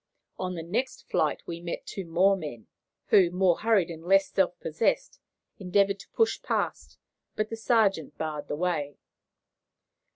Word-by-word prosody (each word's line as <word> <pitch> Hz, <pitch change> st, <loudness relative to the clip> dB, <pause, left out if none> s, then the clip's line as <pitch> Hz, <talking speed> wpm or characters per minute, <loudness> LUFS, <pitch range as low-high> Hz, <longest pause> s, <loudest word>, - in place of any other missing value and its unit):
On 185 Hz, -1 st, -3 dB
the 165 Hz, -, -5 dB
next 235 Hz, +10 st, -3 dB
flight -, -, 0 dB
we 170 Hz, 0 st, -6 dB
met 170 Hz, 0 st, -5 dB
two 195 Hz, -, -6 dB
more 185 Hz, +4 st, +4 dB
men, 145 Hz, -, -7 dB, 0.4 s
who, 185 Hz, -3 st, +6 dB
more 180 Hz, -1 st, +2 dB
hurried 210 Hz, -6 st, +2 dB
and 165 Hz, -1 st, -9 dB
less 195 Hz, +2 st, +4 dB
self 180 Hz, -2 st, +1 dB
possessed, 365 Hz, -, -1 dB, 0.4 s
endeavoured 200 Hz, +1 st, +2 dB
to 195 Hz, -, -13 dB
push 450 Hz, -1 st, +1 dB
past; -, -, -2 dB, 0.4 s
but 215 Hz, 0 st, -1 dB
the 225 Hz, -, -4 dB
sergeant 220 Hz, -, +1 dB
barred 150 Hz, -2 st, -4 dB
the -, -, -2 dB
way. 155 Hz, -4 st, -2 dB
185 Hz, 155 wpm, -28 LUFS, 165-200 Hz, 0.4 s, who